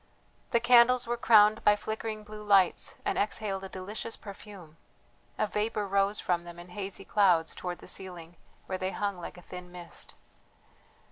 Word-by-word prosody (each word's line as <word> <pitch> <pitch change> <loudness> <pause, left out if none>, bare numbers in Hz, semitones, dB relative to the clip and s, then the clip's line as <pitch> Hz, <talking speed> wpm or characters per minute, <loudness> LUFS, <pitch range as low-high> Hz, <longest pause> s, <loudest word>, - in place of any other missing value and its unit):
The 235 - +3
candles 240 +1 +6
were 240 +1 -1
crowned 215 -2 +5
by 210 - +6
flickering 215 0 -5
blue 210 0 -9
lights 200 -3 +3
and - - 0
exhaled 200 -2 -1
a 195 - -6
delicious 205 +5 -5
perfume; 195 -5 -11 0.6
a - - +2
vapour 210 0 -1
rose 200 +1 +1
from 175 -1 0
them 175 0 -10
in 175 +1 -11
hazy 195 +1 -6
clouds 180 -6 +3
towards 180 -1 -5
the - - -12
ceiling, 175 -3 -4 0.3
where 185 -1 -4
they 185 - -1
hung 200 -3 -2
like 175 - -8
a 175 - -13
thin 180 0 -9
mist. 175 -2 -9
200 Hz, 165 wpm, -29 LUFS, 180-215 Hz, 0.6 s, candles